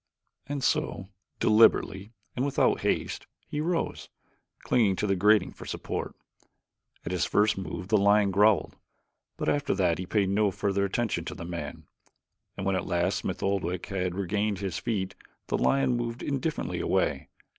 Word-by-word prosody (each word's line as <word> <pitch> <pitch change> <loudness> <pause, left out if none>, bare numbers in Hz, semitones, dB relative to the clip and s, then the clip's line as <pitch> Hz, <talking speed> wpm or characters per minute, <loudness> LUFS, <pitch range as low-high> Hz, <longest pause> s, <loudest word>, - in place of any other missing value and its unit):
And 145 -2 -3
so, 145 -12 0 0.3
deliberately 105 -2 +4 0.2
and 125 - -1
without 140 -1 +2
haste, - - -1 0.2
he 150 -1 -3
rose, 170 +1 -2 0.5
clinging 105 -6 +3
to 105 - -1
the 100 -1 +2
grating 105 +1 +4
for - - -11
support. - - -4 0.9
At - - -3
his 90 -4 +1
first 105 0 +3
move 90 0 -6
the 110 - +4
lion 100 0 +4
growled, 105 +2 +3 0.6
but - - -3
after 145 -8 +1
that 90 -4 +1
he 90 - -5
paid 100 -2 +1
no 105 +1 +2
further 100 +1 0
attention 110 +3 -1
to - - -5
the 85 - -7
man, 85 -4 -6 0.7
and 95 - -4
when 95 -1 +1
at 90 - -2
last 90 +2 +1
Smith 95 - -4
Oldwick 90 -3 -1
had 90 -3 -2
regained 100 +2 -1
his 95 -2 -3
feet 100 -6 -2 0.4
the - - +1
lion 135 -2 +2
moved 120 0 -4
indifferently 145 +3 -2
away. - - 0
100 Hz, 160 wpm, -28 LUFS, 95-115 Hz, 0.9 s, deliberately